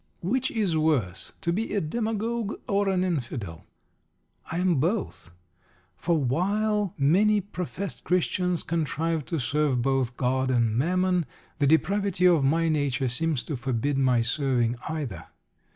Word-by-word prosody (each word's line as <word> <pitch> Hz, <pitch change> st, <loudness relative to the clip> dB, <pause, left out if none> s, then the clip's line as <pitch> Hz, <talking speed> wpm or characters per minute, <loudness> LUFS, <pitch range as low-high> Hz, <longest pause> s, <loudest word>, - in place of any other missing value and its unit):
Which 255 Hz, +8 st, 0 dB
is 205 Hz, -8 st, 0 dB
worse, 145 Hz, -, 0 dB
to 170 Hz, -3 st, 0 dB
be 215 Hz, +3 st, -2 dB
a -, -, +3 dB
Demagogue 220 Hz, +4 st, -2 dB
or 200 Hz, 0 st, +1 dB
an 185 Hz, -1 st, +1 dB
Infidel? 120 Hz, -, -4 dB, 0.8 s
I 165 Hz, -, -2 dB
am 180 Hz, -5 st, +2 dB
both. 180 Hz, -, -2 dB, 0.7 s
For 170 Hz, -, 0 dB
while 200 Hz, -, 0 dB
many 195 Hz, +9 st, +4 dB
professed 195 Hz, -1 st, -5 dB
Christians 180 Hz, 0 st, 0 dB
contrive 160 Hz, -1 st, -1 dB
to 165 Hz, -, -2 dB
serve 135 Hz, -1 st, +1 dB
both 130 Hz, -2 st, 0 dB
God 130 Hz, +1 st, 0 dB
and 115 Hz, -4 st, +2 dB
Mammon, 180 Hz, +4 st, +1 dB, 0.3 s
the 140 Hz, -, +3 dB
depravity 195 Hz, +4 st, +2 dB
of 170 Hz, -5 st, +5 dB
my 165 Hz, +4 st, +2 dB
nature 140 Hz, -4 st, 0 dB
seems 150 Hz, +2 st, -1 dB
to 150 Hz, -, -4 dB
forbid 130 Hz, +2 st, -1 dB
my 125 Hz, -3 st, +3 dB
serving 120 Hz, -2 st, 0 dB
either. 135 Hz, -, -5 dB
160 Hz, 135 wpm, -26 LUFS, 130-185 Hz, 0.8 s, of